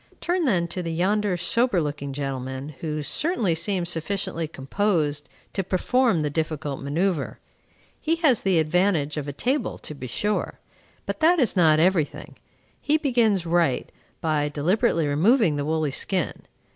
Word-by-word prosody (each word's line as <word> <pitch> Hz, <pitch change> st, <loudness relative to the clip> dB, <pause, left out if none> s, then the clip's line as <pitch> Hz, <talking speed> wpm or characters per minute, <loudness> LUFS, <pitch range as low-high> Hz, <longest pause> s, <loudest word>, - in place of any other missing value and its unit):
Turn 350 Hz, -1 st, 0 dB
then 180 Hz, -9 st, +2 dB
to 180 Hz, -, -4 dB
yonder 190 Hz, +3 st, +1 dB
sober 230 Hz, +3 st, +1 dB
looking 145 Hz, -2 st, -3 dB
gentleman, 135 Hz, 0 st, -4 dB
who 155 Hz, -2 st, -3 dB
certainly 235 Hz, -, +1 dB
seems 175 Hz, +1 st, 0 dB
sufficiently 175 Hz, 0 st, -2 dB
composed 150 Hz, 0 st, -1 dB, 0.2 s
to 195 Hz, -, -1 dB
perform 195 Hz, 0 st, +1 dB
the 150 Hz, -, -1 dB
difficult 155 Hz, -2 st, -3 dB
manoeuvre. 160 Hz, +3 st, -1 dB, 0.6 s
He 325 Hz, +2 st, +1 dB
has 305 Hz, -9 st, +3 dB
the 190 Hz, -3 st, +2 dB
advantage 160 Hz, -2 st, +1 dB
of 150 Hz, -2 st, -4 dB
a -, -, -3 dB
table 260 Hz, -, -1 dB
to -, -, -7 dB
be 130 Hz, -3 st, -7 dB
sure; 210 Hz, -, -2 dB, 0.5 s
but -, -, -4 dB
that 335 Hz, +3 st, +5 dB
is 250 Hz, -, +2 dB
not 160 Hz, -4 st, +5 dB
every 175 Hz, -2 st, +4 dB
thing. -, -, -12 dB, 0.5 s
He 305 Hz, +1 st, +2 dB
begins 235 Hz, -, +2 dB
right, 165 Hz, -6 st, +1 dB, 0.3 s
by 150 Hz, -2 st, 0 dB
deliberately 170 Hz, -, +1 dB
removing 170 Hz, -, +3 dB
the 145 Hz, 0 st, -2 dB
woolly 155 Hz, -1 st, 0 dB
skin. 180 Hz, +5 st, -2 dB
170 Hz, 150 wpm, -24 LUFS, 150-205 Hz, 0.6 s, that